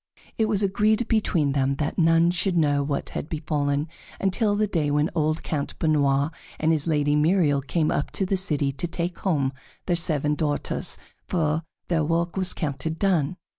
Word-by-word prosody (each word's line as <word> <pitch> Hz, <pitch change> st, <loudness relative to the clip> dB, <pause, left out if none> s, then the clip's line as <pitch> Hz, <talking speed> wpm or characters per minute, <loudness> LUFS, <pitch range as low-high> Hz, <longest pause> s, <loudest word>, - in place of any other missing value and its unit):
It 220 Hz, -, +2 dB
was 210 Hz, -2 st, +2 dB
agreed 210 Hz, +4 st, +2 dB
between 180 Hz, -, +1 dB
them 135 Hz, 0 st, +1 dB
that 150 Hz, +4 st, -2 dB
none 165 Hz, +1 st, +4 dB
should 180 Hz, 0 st, +1 dB
know 145 Hz, -3 st, +3 dB
what 140 Hz, 0 st, -2 dB
had 150 Hz, -, -5 dB
befallen 150 Hz, -2 st, -1 dB, 0.3 s
until 205 Hz, +2 st, +1 dB
the 215 Hz, +1 st, +2 dB
day 165 Hz, -7 st, 0 dB
when 150 Hz, +2 st, +1 dB
old 155 Hz, -1 st, 0 dB
Count 145 Hz, -3 st, -3 dB
Benoît 145 Hz, -1 st, +2 dB, 0.3 s
and 160 Hz, +1 st, +2 dB
his 155 Hz, -1 st, 0 dB
Lady 145 Hz, -2 st, +2 dB
Myriel 150 Hz, -2 st, +3 dB
came 155 Hz, +4 st, 0 dB
up 145 Hz, -, -1 dB
to 195 Hz, -, 0 dB
the 195 Hz, -, 0 dB
city 150 Hz, -7 st, +1 dB
to 140 Hz, +6 st, -3 dB
take 170 Hz, +1 st, -3 dB
home 140 Hz, -8 st, 0 dB, 0.3 s
their 175 Hz, -, +1 dB
seven 150 Hz, -3 st, 0 dB
daughters, 150 Hz, -1 st, -2 dB, 0.3 s
for 160 Hz, -3 st, 0 dB, 0.3 s
their 165 Hz, -3 st, +1 dB
work 170 Hz, +2 st, 0 dB
was 185 Hz, -1 st, 0 dB
counted 160 Hz, +1 st, -3 dB
done. 180 Hz, -4 st, +1 dB
160 Hz, 175 wpm, -25 LUFS, 145-180 Hz, 0.3 s, none